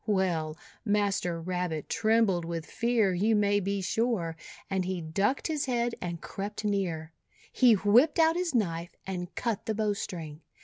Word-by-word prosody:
Well, 170 Hz, -6 st, 0 dB, 0.3 s
Master 200 Hz, -5 st, 0 dB
Rabbit 175 Hz, -3 st, -3 dB
trembled 220 Hz, -5 st, +2 dB
with 165 Hz, -1 st, -4 dB
fear, 230 Hz, -5 st, +1 dB
you 210 Hz, +5 st, +2 dB
may 205 Hz, -1 st, +3 dB
be 200 Hz, 0 st, -1 dB
sure, 190 Hz, -4 st, 0 dB, 0.3 s
and 190 Hz, -1 st, 0 dB
he 185 Hz, 0 st, -2 dB
ducked 195 Hz, +11 st, 0 dB
his 310 Hz, -3 st, 0 dB
head 240 Hz, -2 st, 0 dB
and 170 Hz, -1 st, -4 dB
crept 205 Hz, +4 st, -5 dB
near. 170 Hz, -6 st, -1 dB, 0.4 s
He 245 Hz, -2 st, +5 dB
whipped 215 Hz, +10 st, +4 dB
out 325 Hz, 0 st, +5 dB
his 350 Hz, -5 st, -1 dB
knife, 170 Hz, -6 st, -1 dB
and 180 Hz, -1 st, -5 dB
cut 230 Hz, -4 st, -2 dB
the 220 Hz, -, 0 dB
bowstring. 180 Hz, -7 st, -3 dB
200 Hz, 150 wpm, -29 LUFS, 175-225 Hz, 0.4 s, He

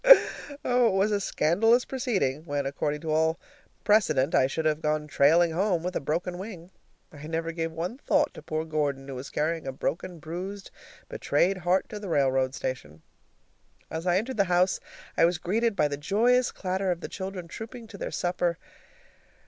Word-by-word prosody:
Oh, 245 Hz, -1 st, +4 dB
it -, -, +1 dB
was 195 Hz, +2 st, +2 dB
a 205 Hz, -, +2 dB
scandalous 225 Hz, +10 st, +3 dB
proceeding, 195 Hz, -, -1 dB
when, 145 Hz, -3 st, -2 dB
according 145 Hz, +2 st, -2 dB
to 160 Hz, -, -3 dB
all 160 Hz, +1 st, +2 dB, 0.4 s
precedent, 165 Hz, -10 st, +3 dB
I 130 Hz, -, +4 dB
should 160 Hz, +4 st, -3 dB
have 155 Hz, 0 st, +1 dB
gone 150 Hz, 0 st, 0 dB
trailing 160 Hz, +4 st, +4 dB
home 180 Hz, 0 st, +1 dB
with 180 Hz, +1 st, -3 dB
a -, -, +1 dB
broken 175 Hz, +5 st, -2 dB
wing. 185 Hz, -3 st, -8 dB, 0.4 s
I 150 Hz, 0 st, -9 dB
never 165 Hz, +1 st, -2 dB
gave 165 Hz, -1 st, -3 dB
one 175 Hz, +10 st, -4 dB
thought 295 Hz, 0 st, +2 dB
to -, -, -10 dB
poor 155 Hz, 0 st, -3 dB
Gordon, 145 Hz, -4 st, -1 dB
who 135 Hz, -, -6 dB
was 130 Hz, +2 st, -7 dB
carrying 160 Hz, 0 st, -1 dB
a -, -, -1 dB
broken, 170 Hz, +6 st, -3 dB
bruised, 180 Hz, +6 st, -6 dB, 0.4 s
betrayed 195 Hz, -, +1 dB
heart 180 Hz, +2 st, +1 dB
to 210 Hz, -, -6 dB
the 205 Hz, -2 st, -6 dB
railroad 135 Hz, -3 st, +2 dB
station. 80 Hz, -, -5 dB, 0.9 s
As 165 Hz, +3 st, -4 dB
I 175 Hz, 0 st, +4 dB
entered 235 Hz, +5 st, -2 dB
the 200 Hz, -, +4 dB
house 180 Hz, +1 st, +2 dB, 0.4 s
I -, -, +5 dB
was 175 Hz, 0 st, +1 dB
greeted 220 Hz, +6 st, 0 dB
by 150 Hz, -, +3 dB
the 145 Hz, -1 st, -4 dB
joyous 235 Hz, -, +2 dB
clatter 190 Hz, 0 st, -2 dB
of 175 Hz, -1 st, -1 dB
the -, -, -4 dB
children 190 Hz, -2 st, -6 dB
trooping 230 Hz, +6 st, -8 dB
to 200 Hz, -, -10 dB
their -, -, -3 dB
supper. 175 Hz, -1 st, -1 dB
170 Hz, 185 wpm, -27 LUFS, 150-195 Hz, 0.9 s, I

